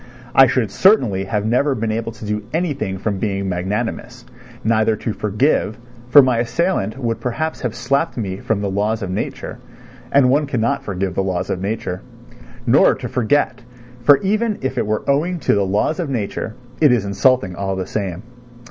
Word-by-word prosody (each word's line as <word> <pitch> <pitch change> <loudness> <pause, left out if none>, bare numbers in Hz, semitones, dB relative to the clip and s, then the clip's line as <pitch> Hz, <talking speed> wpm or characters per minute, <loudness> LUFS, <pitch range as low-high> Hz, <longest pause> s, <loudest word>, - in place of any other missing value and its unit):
I 135 -1 +7
should 115 -5 0
certainly 110 - +3
have 105 0 -1
never 130 +5 +2
been 115 -1 -2
able 115 +1 -2
to 115 -1 -10
do 105 0 -2
anything 140 - -1
from 100 0 -2
being 100 -2 -2
magnanimous—neither 105 +4 -2
to 110 +1 -3
forgive, 110 +1 0 0.3
for 140 +3 +9
my 125 -3 +2
assailant 120 - 0
would 115 -4 -2
perhaps 155 +6 -3
have 120 -3 -3
slapped 140 +2 0
me 95 -5 -3
from 105 0 -1
the 100 -1 -2
laws 105 +2 -1
of 95 - -4
nature, 95 - -4 0.5
and 130 -2 +5
one 145 +2 +2
cannot 115 -4 0
forgive 95 -2 -3
the 95 - 0
laws 95 -2 -2
of 90 - -2
nature; 95 -3 -3 0.6
nor - - +5
to - - -6
forget, 125 0 0 0.4
for 140 +3 +7
even 215 +2 +1
if 130 - -2
it - - -1
were 110 0 -2
owing 160 +6 +1
to - - +2
the 100 -1 +1
laws 105 - 0
of 165 -5 -2
nature, 110 -2 -3 0.3
it 150 -4 +6
is 115 -5 +2
insulting 100 -1 +2
all 95 +1 -2
the 95 -1 -3
same. 95 -3 -4
110 Hz, 180 wpm, -19 LUFS, 100-135 Hz, 0.6 s, for